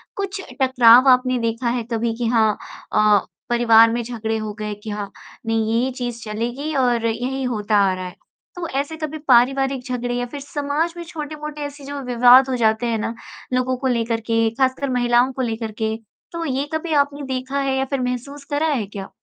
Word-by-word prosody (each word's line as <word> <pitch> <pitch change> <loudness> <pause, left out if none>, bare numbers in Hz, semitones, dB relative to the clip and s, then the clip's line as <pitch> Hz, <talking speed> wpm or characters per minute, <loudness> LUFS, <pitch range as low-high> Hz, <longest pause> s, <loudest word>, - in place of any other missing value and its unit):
कुछ 395 -1 -4 0.2
टकराव 255 -1 +6
आपने 255 0 +4
देखा 230 +1 -1
है 240 0 -1
कभी 230 0 0
कि 240 -1 -1
हाँ 220 -3 +2 0.4
अ, 210 -1 +5 0.3
परिवार 230 -1 +6
में 240 +1 -1
झगड़े 225 -2 -3
हो 215 -1 -4
गए 210 0 -3
कि 220 - -6
हाँ, 205 -1 -5 0.3
नहीं 225 +1 +1
ये 265 - -1
चीज़ 240 -1 -4
चलेगी 240 +8 -3
और 245 -3 +2
यही 255 +4 -2
होता 215 -4 0
आ - - 0
रहा 185 0 -6
है। 180 - -8 0.4
तो 350 -1 -4
ऐसे 290 +3 -4
कभी 310 -1 -4
पारिवारिक 270 +1 +3
झगड़े 245 -1 -2
या 245 0 -1
फिर 285 +4 -7
समाज 290 +4 -2
में 345 - -5
छोटे-मोटे 300 -2 -7
ऐसे 285 -1 -7
जो 285 +1 -5
विवाद 250 +2 +6
हो 260 - 0
जाते 220 0 +2
हैं 230 -1 0
ना 225 - -2 0.4
लोगों 255 0 +1
को 265 - -2
लेकर 230 -2 0
के, 225 0 +1
खासकर 265 +2 0
महिलाओं 245 0 +2
को 260 - -3
लेकर 225 -2 -3
के, 220 0 0 0.4
तो 335 -1 -4
ये 275 0 -1
कभी 315 +1 -2
आपने 285 0 +1
देखा 260 +2 -3
है 270 -1 0
या 265 - 0
फिर 275 0 -2
महसूस 250 +3 -4
करा 295 +2 +1
है 270 -9 0
क्या? 195 -1 -8
250 Hz, 200 wpm, -21 LUFS, 230-275 Hz, 0.4 s, टकराव